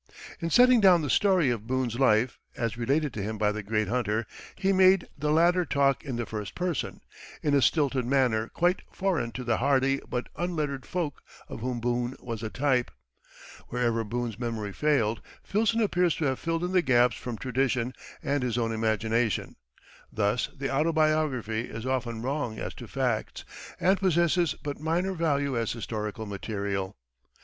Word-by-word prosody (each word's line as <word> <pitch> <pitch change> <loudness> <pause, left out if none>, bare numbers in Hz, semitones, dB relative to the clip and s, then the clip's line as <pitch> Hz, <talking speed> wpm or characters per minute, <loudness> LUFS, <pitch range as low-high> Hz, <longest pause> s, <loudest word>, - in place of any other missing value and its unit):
In 165 - -2
setting 250 +3 +6
down 180 -5 +6
the 145 - -1
story 185 -9 +3
of 110 -2 -4
Boone's 125 -2 -1
life, 120 -1 +3 0.2
as 115 -1 -1
related 135 +4 0
to 105 - -4
him 110 +2 -3
by 105 0 +2
the 110 +1 -4
great 105 0 -1
hunter, 110 -1 0 0.3
he 195 0 +1
made 185 -1 +5
the 150 +1 -2
latter 170 +4 +4
talk 140 -4 +1
in 135 -4 -4
the 120 0 -2
first 105 -3 -6
person, 180 -6 -2 0.4
in 145 - +1
a 140 - +4
stilted 140 -3 +2
manner 120 -4 +2
quite 175 +6 +1
foreign 185 -11 -1
to 125 - -5
the 120 -2 +1
hardy 135 +1 +2
but 125 0 -2
unlettered 155 -6 -2
folk 170 -6 -3 0.3
of - - -7
whom 125 +1 -3
Boone 120 +2 -1
was 115 -3 -6
a 110 - -3
type. 130 -1 +1 0.8
Wherever 115 -2 0
Boone's 115 0 -4
memory 115 -4 -3
failed, 115 -7 +1 0.2
Filson 225 +2 +1
appears 180 -5 +2
to 160 - -1
have 130 -2 0
filled 165 +1 -1
in 180 - -1
the 185 -1 +4
gaps 125 -5 +3
from 120 -3 -6
tradition 130 -1 0 0.3
and 140 0 0
his 125 -2 -1
own 115 -1 0
imagination; 110 0 0 0.6
thus 105 +2 0
the 135 0 -2
autobiography 155 -7 +1
is 115 +1 -7
often 120 -3 -2
wrong 130 -4 -2
as - - -5
to - - -10
facts, - - -2 0.3
and 190 +2 +3
possesses 170 -3 +2
but 145 -1 -4
minor 170 +5 0
value 145 -5 0
as 115 -2 0
historical 110 -1 -4
material. 100 - -3
130 Hz, 170 wpm, -28 LUFS, 115-155 Hz, 0.8 s, setting